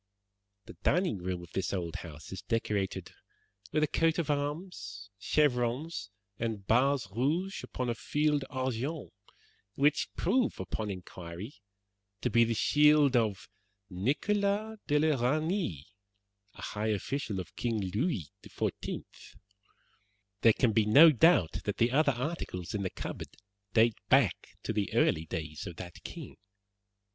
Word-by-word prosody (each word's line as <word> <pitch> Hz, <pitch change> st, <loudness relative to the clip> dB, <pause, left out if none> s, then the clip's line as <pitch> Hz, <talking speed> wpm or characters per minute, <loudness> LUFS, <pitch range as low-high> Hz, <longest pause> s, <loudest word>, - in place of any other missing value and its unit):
The -, -, -10 dB
dining 180 Hz, -, +2 dB
room 90 Hz, 0 st, -3 dB
of 85 Hz, -, -13 dB
this 95 Hz, -, -1 dB
old 85 Hz, -4 st, -3 dB
house 75 Hz, -3 st, -10 dB
is 95 Hz, -, -6 dB
decorated 105 Hz, -4 st, -2 dB, 0.6 s
with 155 Hz, -, +2 dB
a -, -, +3 dB
coat 165 Hz, +2 st, +2 dB
of 160 Hz, -3 st, 0 dB
arms, 145 Hz, -, -4 dB
chevrons, 130 Hz, +5 st, 0 dB, 0.3 s
and 110 Hz, -4 st, -3 dB
bars 130 Hz, +2 st, +3 dB
rouge 165 Hz, +11 st, 0 dB
upon 125 Hz, -, -4 dB
a 120 Hz, -, +1 dB
field 145 Hz, +6 st, 0 dB
argent, 130 Hz, +3 st, -3 dB, 0.6 s
which 145 Hz, +2 st, +2 dB
prove, 255 Hz, -2 st, +1 dB
upon 110 Hz, -2 st, -3 dB
inquiry, 90 Hz, +3 st, -7 dB, 0.7 s
to 125 Hz, -, 0 dB
be 115 Hz, +1 st, +6 dB
the 115 Hz, 0 st, 0 dB
shield 150 Hz, +1 st, +5 dB
of 110 Hz, -5 st, +1 dB, 0.4 s
Nicholas 200 Hz, -, 0 dB
de 150 Hz, -, +3 dB
la 150 Hz, -4 st, +2 dB
Reynie, 155 Hz, -, 0 dB, 0.7 s
a -, -, -10 dB
high 105 Hz, +1 st, -3 dB
official 110 Hz, 0 st, -2 dB
of 90 Hz, -, -8 dB
King 115 Hz, -3 st, -1 dB
Louis 105 Hz, -, -1 dB
XIV. -, -, -4 dB, 1.4 s
There 115 Hz, -, +7 dB
can 120 Hz, 0 st, +2 dB
be 105 Hz, 0 st, +2 dB
no 155 Hz, +9 st, +9 dB
doubt 110 Hz, -, +4 dB
that 105 Hz, -, -2 dB
the 115 Hz, +1 st, +3 dB
other 140 Hz, +1 st, +3 dB
articles 120 Hz, -, -4 dB
in 105 Hz, -, -1 dB
the 95 Hz, -, -1 dB
cupboard -, -, -6 dB, 0.5 s
date 115 Hz, -1 st, +4 dB
back 125 Hz, -, +2 dB
to -, -, -2 dB
the 105 Hz, -2 st, -1 dB
early 80 Hz, +1 st, +2 dB
days 80 Hz, -1 st, -5 dB
of 85 Hz, -, -7 dB
that 90 Hz, 0 st, -9 dB
king. -, -, -8 dB
120 Hz, 140 wpm, -31 LUFS, 100-150 Hz, 1.4 s, no